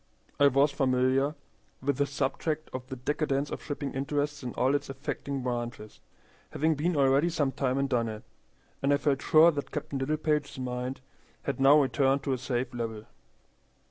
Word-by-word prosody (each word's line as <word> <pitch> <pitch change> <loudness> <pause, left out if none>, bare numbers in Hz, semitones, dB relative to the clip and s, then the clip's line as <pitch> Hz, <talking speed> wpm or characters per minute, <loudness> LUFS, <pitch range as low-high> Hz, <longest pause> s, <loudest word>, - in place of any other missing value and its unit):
I 145 - +7
was 140 +2 +4
familiar 135 +1 +2 0.4
with 140 0 -1
the 145 - +1
subject 150 +3 -2
of 130 0 -5
the 130 - -6
decadence 140 +2 -1
of - - -5
shipping 145 -1 -4
interests 145 +1 -2
in 125 -2 -4
all 130 +2 +2
its 145 -1 -1
affecting 135 0 -4
branches, 120 -3 -4 0.5
having 160 +2 +2
been 160 +4 0
already 140 +4 +4
some 145 -5 0
time 130 -1 -1
in 140 - +1
Dunnet, 115 -4 -1 0.6
and 140 - +2
I 140 - +5
felt 140 -1 0
sure 160 +2 +6
that 145 -2 -4
Captain 140 - -4
Littlepage's 150 +1 -1
mind 125 +1 -4 0.4
had 140 - -3
now 140 +3 +7
returned 135 0 +2
to 135 - 0
a 130 - -2
safe 125 0 -2
level. 115 -2 -4
135 Hz, 170 wpm, -29 LUFS, 130-145 Hz, 0.6 s, I